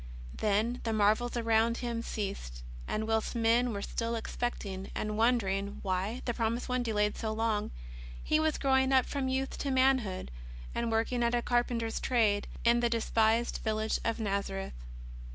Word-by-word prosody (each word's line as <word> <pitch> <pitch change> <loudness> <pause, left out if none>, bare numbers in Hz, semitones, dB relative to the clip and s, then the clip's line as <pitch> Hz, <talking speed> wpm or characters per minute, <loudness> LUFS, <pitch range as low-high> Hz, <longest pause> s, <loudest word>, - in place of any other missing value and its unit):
Then 215 +4 0
the 225 - -1
marvels 220 +4 +2
around 230 0 +2
Him 235 -2 -2
ceased, 195 - -5 0.2
and 220 - -1
whilst 225 +2 0
men 235 +1 +3
were 200 -2 -4
still 230 0 -2
expecting, 205 -4 -4
and 215 0 -2
wondering 205 -4 +1
why 195 +6 -2
the 240 - 0
promised 230 +1 -1
One 250 -1 0
delayed 210 -3 +1
so 220 -2 -3
long, 220 -1 0 0.5
He 310 - +2
was 315 -1 +1
growing 265 -1 +3
up 260 -2 +5
from 275 -2 -2
youth 265 +1 -2
to 280 - -2
manhood, 260 - +2 0.4
and 235 -1 -1
work 225 +2 +1
ing 245 -1 0
at 235 0 +2
a 240 - 0
carpenter's 240 -2 0
trade 215 -5 +2 0.2
in 235 0 +5
the 240 0 +2
despised 230 0 +2
village 220 0 0
of 230 0 -1
Nazareth. 195 -2 -2
230 Hz, 165 wpm, -31 LUFS, 210-240 Hz, 0.5 s, up